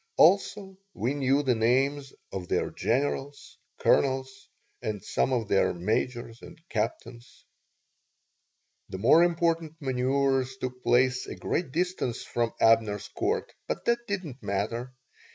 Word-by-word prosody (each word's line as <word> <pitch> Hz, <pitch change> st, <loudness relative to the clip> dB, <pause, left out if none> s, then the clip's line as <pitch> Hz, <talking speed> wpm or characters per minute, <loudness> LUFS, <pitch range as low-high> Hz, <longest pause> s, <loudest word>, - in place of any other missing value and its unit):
Also, 195 Hz, +2 st, +3 dB, 0.2 s
we 125 Hz, +5 st, -1 dB
knew 140 Hz, 0 st, +2 dB
the 130 Hz, -3 st, +3 dB
names 135 Hz, +5 st, +1 dB, 0.2 s
of 90 Hz, -2 st, -5 dB
their -, -, 0 dB
generals, 140 Hz, +3 st, -2 dB, 0.2 s
colonels, 130 Hz, -1 st, +1 dB, 0.3 s
and 105 Hz, -2 st, -4 dB
some -, -, 0 dB
of 120 Hz, -4 st, 0 dB
their 100 Hz, -2 st, +2 dB
majors 115 Hz, +5 st, -2 dB
or -, -, -11 dB
captains. 115 Hz, +2 st, -4 dB, 1.4 s
The -, -, -5 dB
more 135 Hz, -, +6 dB
important 165 Hz, -2 st, 0 dB
manoeuvers 130 Hz, 0 st, 0 dB
took 125 Hz, -1 st, -5 dB
place 125 Hz, +1 st, +2 dB
a -, -, -6 dB
great 170 Hz, -6 st, -2 dB
distance 175 Hz, -7 st, -1 dB
from 115 Hz, -1 st, -1 dB
Abner's 110 Hz, -3 st, +3 dB
Court, -, -, -2 dB
but -, -, -4 dB
that 235 Hz, 0 st, +1 dB
did 200 Hz, -2 st, -2 dB
not 135 Hz, -3 st, -9 dB
matter. 110 Hz, +5 st, -2 dB
130 Hz, 130 wpm, -28 LUFS, 115-145 Hz, 1.4 s, more